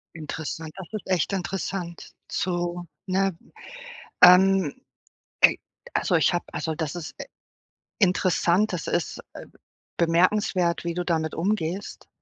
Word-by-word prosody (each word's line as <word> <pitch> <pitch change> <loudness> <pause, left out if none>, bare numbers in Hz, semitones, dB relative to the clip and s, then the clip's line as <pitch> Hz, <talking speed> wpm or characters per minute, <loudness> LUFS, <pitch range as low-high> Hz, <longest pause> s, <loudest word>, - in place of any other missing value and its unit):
Interessant, 155 0 -6
das 190 -2 -8
ist 215 - -6
echt 185 0 +1
interessant 180 -2 -4 0.2
zu 175 -1 -2 0.2
ne? 190 -1 +1 0.9
Ähm, 185 -3 +7 0.7
äh, - - +7 0.4
also - - 0
ich - - +4
habe 175 - -1
also 160 +2 -2
das 155 -1 -3
ist, 170 -3 -7
äh, - - -5 0.8
interessant, 185 0 +2
das 175 - -4
ist, - - -1
äh, - - -9 0.5
bemerkenswert, 175 +1 +2
wie 170 -1 -3
du 180 0 -2
damit 160 -3 -1
umgehst. 190 +1 -2
175 Hz, 125 wpm, -25 LUFS, 165-190 Hz, 0.9 s, Ähm